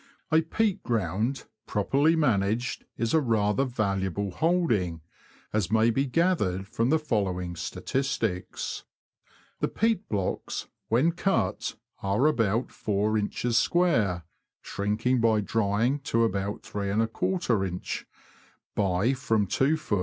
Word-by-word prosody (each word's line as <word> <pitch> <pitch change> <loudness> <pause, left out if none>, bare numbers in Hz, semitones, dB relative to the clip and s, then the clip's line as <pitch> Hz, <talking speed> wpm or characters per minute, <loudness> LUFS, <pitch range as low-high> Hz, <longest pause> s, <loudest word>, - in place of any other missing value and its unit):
A 160 +1 +5
peat 195 +4 0
ground, 115 +3 -1 0.2
properly 140 +10 +2
managed, 115 -4 +1
is 115 -1 -1
a 160 - +5
rather 110 0 +2
valuable 100 -5 -1
holding, 115 - +1 0.5
as 105 -4 0
may 110 +1 +4
be 135 +4 0
gathered 125 - +1
from 115 +3 0
the 160 - +4
following 95 - -1
statistics. 115 - -2 0.8
The - - +1
peat 220 -2 0
blocks, 100 -3 -2 0.2
when 130 +9 +3
cut, 195 +3 0 0.3
are 100 +7 +1
about 115 -5 +2
4in. 105 +3 -1
square 115 - +2 0.4
(shrinking 110 +5 0
by 110 -2 +4
drying 110 +6 +1
to 115 0 +3
about 100 -1 -1
3Jin.) 110 - -1 0.7
by 100 +5 +1
from 115 -5 +1
2ft. 135 - +1
115 Hz, 110 wpm, -27 LUFS, 100-140 Hz, 0.8 s, A